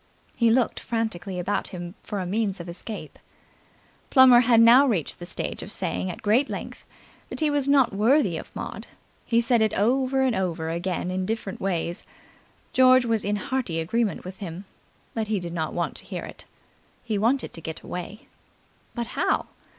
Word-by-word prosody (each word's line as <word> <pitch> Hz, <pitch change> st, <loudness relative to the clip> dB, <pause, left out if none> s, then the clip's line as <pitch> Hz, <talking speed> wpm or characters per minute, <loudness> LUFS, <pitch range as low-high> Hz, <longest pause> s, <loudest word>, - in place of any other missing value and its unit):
He 235 Hz, -2 st, +3 dB
looked 235 Hz, 0 st, +2 dB
frantically 210 Hz, -6 st, -3 dB
about 180 Hz, +3 st, -1 dB
him 175 Hz, -2 st, -7 dB
for 205 Hz, -, -4 dB
a 185 Hz, -, -3 dB
means 200 Hz, +1 st, -1 dB
of 170 Hz, -, -7 dB
escape. 185 Hz, +5 st, -7 dB, 0.9 s
Plummer 260 Hz, -3 st, +8 dB
had 240 Hz, -2 st, +5 dB
now 240 Hz, +5 st, +7 dB
reached 185 Hz, -, -1 dB
the 175 Hz, -, -6 dB
stage -, -, -3 dB
of -, -, -7 dB
saying 90 Hz, +2 st, -2 dB
at -, -, -7 dB
great 235 Hz, +7 st, +3 dB
length -, -, -7 dB, 0.4 s
that -, -, -6 dB
he 310 Hz, -2 st, +2 dB
was 285 Hz, -1 st, 0 dB
not 270 Hz, -6 st, +4 dB
worthy 215 Hz, -, +3 dB
of -, -, -7 dB
Maud. -, -, -6 dB, 0.4 s
He 230 Hz, -1 st, +3 dB
said 235 Hz, 0 st, +2 dB
it 220 Hz, -, +2 dB
over 260 Hz, +5 st, +2 dB
and 255 Hz, -3 st, +2 dB
over, 165 Hz, -4 st, -2 dB
again 175 Hz, +1 st, -2 dB
in 185 Hz, 0 st, -2 dB
different 220 Hz, -3 st, -4 dB
ways. 175 Hz, -2 st, -1 dB, 0.7 s
George 255 Hz, -1 st, +6 dB
was 225 Hz, -2 st, 0 dB
in 205 Hz, +1 st, 0 dB
hearty 210 Hz, -7 st, -2 dB
agreement 210 Hz, +6 st, -1 dB
with 185 Hz, +1 st, -8 dB
him, 185 Hz, -1 st, -7 dB, 0.5 s
but 220 Hz, -2 st, -2 dB
he 210 Hz, -2 st, 0 dB
did 170 Hz, -1 st, -6 dB
not 160 Hz, -2 st, -2 dB
want -, -, -2 dB
to -, -, -12 dB
hear -, -, -5 dB
it. -, -, -10 dB, 0.6 s
He 220 Hz, -4 st, -1 dB
wanted 245 Hz, +5 st, +1 dB
to 165 Hz, -, -8 dB
get 160 Hz, +1 st, -6 dB
away. 180 Hz, +6 st, -7 dB, 0.7 s
But 235 Hz, -1 st, -2 dB
how? -, -, 0 dB
215 Hz, 180 wpm, -25 LUFS, 180-240 Hz, 0.9 s, Plummer